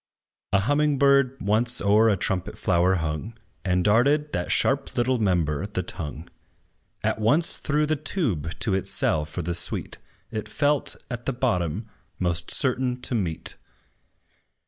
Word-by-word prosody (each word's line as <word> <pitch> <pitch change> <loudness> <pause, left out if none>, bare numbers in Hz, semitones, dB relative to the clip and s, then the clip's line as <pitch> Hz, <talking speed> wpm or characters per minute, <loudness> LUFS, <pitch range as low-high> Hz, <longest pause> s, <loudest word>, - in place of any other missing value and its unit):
A 100 - +3
humming 145 +5 +2
bird 140 -1 +3
once 115 +5 +2
o'er 105 +3 +4
a 100 - +2
trumpet 90 0 -1
flower 90 +1 +2
hung, 80 +7 -3 0.3
And 90 -1 +1
darted 140 +9 +3
that 85 - -2
sharp 135 0 +1
little 125 +1 +2
member, 90 -4 0
the 95 -3 -3
tongue, 85 -2 -5 0.8
At - - 0
once 145 +10 +3
through 150 0 0
the 155 +1 +1
tube 115 - -2
to 105 - +1
its 95 - -1
cell 75 -1 +2
for 80 +3 -5
the 85 +2 -2
sweet 85 - -2 0.3
It 110 - -4
felt, 145 -1 +1 0.2
at 120 0 -5
the 135 - +1
bottom, 105 - -1 0.3
most 85 -2 -1
certain 125 -1 0
to 125 - -2
meet. 90 -9 -2
110 Hz, 150 wpm, -25 LUFS, 90-135 Hz, 0.8 s, o'er